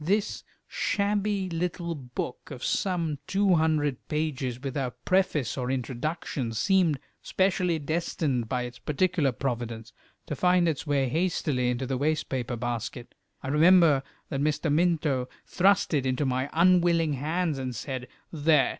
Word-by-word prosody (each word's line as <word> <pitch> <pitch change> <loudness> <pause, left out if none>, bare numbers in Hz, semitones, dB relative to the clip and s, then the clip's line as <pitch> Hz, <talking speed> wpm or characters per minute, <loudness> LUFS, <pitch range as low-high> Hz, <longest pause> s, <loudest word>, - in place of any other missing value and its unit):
This 200 +6 0 0.2
shabby 200 -1 0
little 170 0 -2
book 125 -3 -6
of 130 -4 -8
some 170 -7 0
two 195 -1 +3
hundred 155 -5 +1
pages, 135 -5 -2
without 130 -1 -4
preface 170 -9 +1
or 125 0 -2
introduction, 130 0 -3
seemed 170 - +2 0.2
specially 185 -3 +1
destined 150 -6 -1
by 125 -1 -1
its 120 -1 -8
particular 160 -2 +1
providence 120 -2 -4 0.3
to 150 - -4
find 180 +2 +3
its 155 -1 -2
way 140 -2 +2
hastily 150 -4 0
into 125 +2 -1
the 130 0 -2
waste 155 +2 0
paper 125 -2 -2
basket. 120 0 -4 0.3
I 135 - -3
remember 160 -1 +6 0.3
that 135 - -2
Mr. 150 +1 +1
Minto 155 -6 +1 0.2
thrust 200 0 +2
it 135 -3 +1
into 130 +3 0
my 130 +1 -1
unwilling 170 -2 +4
hands, 155 +2 -1
and 130 -2 -4
said 130 +2 -5 0.3
"There! 150 -2 +3
150 Hz, 140 wpm, -27 LUFS, 130-175 Hz, 0.3 s, remember